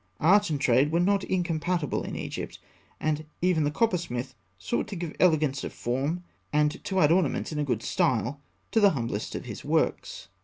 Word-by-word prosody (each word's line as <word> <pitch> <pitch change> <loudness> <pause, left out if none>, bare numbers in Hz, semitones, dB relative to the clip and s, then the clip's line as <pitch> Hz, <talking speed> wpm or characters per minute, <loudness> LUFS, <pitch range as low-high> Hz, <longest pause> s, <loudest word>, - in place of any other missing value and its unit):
Art 200 +4 +5
and 150 -3 -1
trade 135 +2 +3
were 170 - +2
not 195 +2 +2
incompatible 170 -3 -1
in - - -5
Egypt; - - -5 0.4
and 155 0 -1 0.2
even 175 -4 +2
the - - +2
coppersmith 160 - -1 0.2
sought 90 - -2
to 205 - -6
give 170 -3 -5
elegance 155 -6 +3
of - - -5
form, 140 +9 -2 0.3
and 150 0 +1
to 190 -1 0
add 150 - +5
ornaments 170 -4 +1
in 150 - -3
a - - +1
good 120 -6 -1
style, 130 +3 0 0.3
to 225 - +3
the 205 -2 +7
humblest 115 -3 -3
of - - -5
his - - -7
works. - - -1
155 Hz, 185 wpm, -27 LUFS, 135-180 Hz, 0.4 s, the